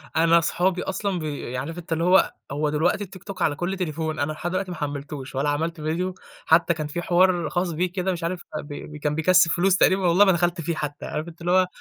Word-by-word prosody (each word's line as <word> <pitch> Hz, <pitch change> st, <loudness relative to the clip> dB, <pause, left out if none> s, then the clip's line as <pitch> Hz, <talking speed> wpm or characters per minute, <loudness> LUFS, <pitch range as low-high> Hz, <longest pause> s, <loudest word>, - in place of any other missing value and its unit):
أنا 165 Hz, +1 st, +5 dB
صحابي 180 Hz, +2 st, 0 dB
أصلًا 190 Hz, -1 st, -2 dB
ب 150 Hz, -5 st, -5 dB
عارف 155 Hz, +7 st, -4 dB
أنت 170 Hz, -1 st, -4 dB
اللي 165 Hz, +1 st, -1 dB
هو 185 Hz, +2 st, +4 dB, 0.2 s
هو 150 Hz, +2 st, 0 dB
دلوقتي 175 Hz, +7 st, +1 dB
الTikTok 185 Hz, +1 st, -10 dB
على 145 Hz, -3 st, +2 dB
كل 180 Hz, +4 st, -3 dB
تليفون، 160 Hz, -3 st, -3 dB
أنا 145 Hz, +2 st, 0 dB
لحد 170 Hz, +3 st, -4 dB
دلوقتي 185 Hz, 0 st, -2 dB
ما 175 Hz, -, -6 dB
حمّلتهوش 145 Hz, -2 st, -5 dB
ولا 140 Hz, +2 st, +1 dB
عملت 160 Hz, +3 st, -2 dB
فيديو. 175 Hz, +4 st, -2 dB, 0.3 s
حتّى 170 Hz, +1 st, +4 dB
كان 155 Hz, -2 st, -4 dB
في 175 Hz, +4 st, -4 dB
حوار 175 Hz, -2 st, +3 dB
خاص 175 Hz, -1 st, -1 dB
بيه 175 Hz, +3 st, -1 dB
كده 185 Hz, 0 st, -1 dB
مش 175 Hz, -2 st, -4 dB
عارف 175 Hz, +2 st, -2 dB, 0.2 s
فب 150 Hz, -, -5 dB
ب 150 Hz, 0 st, -8 dB
كان 150 Hz, 0 st, -1 dB
بيكسِّب 170 Hz, +1 st, +4 dB
فلوس 185 Hz, +2 st, +3 dB
تقريبًا 190 Hz, -1 st, +3 dB
والله 180 Hz, +4 st, +6 dB
ما 190 Hz, -, +5 dB
دخلت 175 Hz, 0 st, 0 dB
فيه 165 Hz, +1 st, -2 dB
حتّى، 145 Hz, -1 st, -5 dB
عارف 155 Hz, +2 st, -4 dB
أنت 170 Hz, 0 st, -12 dB
اللي 175 Hz, +1 st, -1 dB
هو، 185 Hz, 0 st, +4 dB
170 Hz, 235 wpm, -24 LUFS, 155-180 Hz, 0.3 s, والله